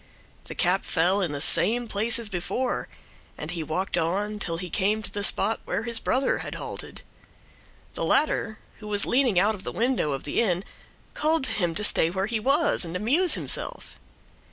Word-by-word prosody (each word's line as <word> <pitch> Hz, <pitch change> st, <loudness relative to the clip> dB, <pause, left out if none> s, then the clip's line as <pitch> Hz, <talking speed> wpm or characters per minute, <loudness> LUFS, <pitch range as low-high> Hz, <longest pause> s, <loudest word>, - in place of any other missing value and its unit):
The -, -, -8 dB
cap 185 Hz, +2 st, +2 dB
fell 180 Hz, +5 st, +2 dB
in 175 Hz, -5 st, -1 dB
the 145 Hz, -, -4 dB
same 235 Hz, +10 st, +2 dB
place 220 Hz, +2 st, +2 dB
as 230 Hz, -2 st, -4 dB
before, 205 Hz, +7 st, -2 dB, 0.5 s
and 150 Hz, +2 st, -4 dB
he 170 Hz, -2 st, -3 dB
walked 175 Hz, +4 st, -1 dB
on 205 Hz, +6 st, -1 dB
till 165 Hz, -4 st, -2 dB
he 180 Hz, +1 st, -4 dB
came 210 Hz, +2 st, +1 dB
to -, -, -6 dB
the 205 Hz, -, -4 dB
spot 215 Hz, +2 st, +2 dB
where -, -, -2 dB
his 230 Hz, 0 st, +1 dB
brother 265 Hz, +4 st, +1 dB
had -, -, -5 dB
halted. -, -, -7 dB, 0.9 s
The -, -, -4 dB
latter, 225 Hz, -7 st, +1 dB, 0.2 s
who 210 Hz, -, -9 dB
was 205 Hz, -1 st, +1 dB
leaning 245 Hz, -6 st, +2 dB
out 210 Hz, +4 st, +3 dB
of 200 Hz, -3 st, -9 dB
the -, -, -4 dB
window 235 Hz, -, 0 dB
of 135 Hz, -, -5 dB
the 145 Hz, -, 0 dB
inn, 185 Hz, -5 st, 0 dB, 0.5 s
called 315 Hz, 0 st, +1 dB
to 260 Hz, -, -1 dB
him 175 Hz, -5 st, -1 dB
to 210 Hz, -, -1 dB
stay 165 Hz, -, +5 dB
where 190 Hz, +2 st, -1 dB
he 220 Hz, +1 st, -2 dB
was 280 Hz, +5 st, +2 dB
and 170 Hz, 0 st, -5 dB
amuse 285 Hz, -, +2 dB
himself. -, -, -2 dB
205 Hz, 195 wpm, -26 LUFS, 180-235 Hz, 0.9 s, stay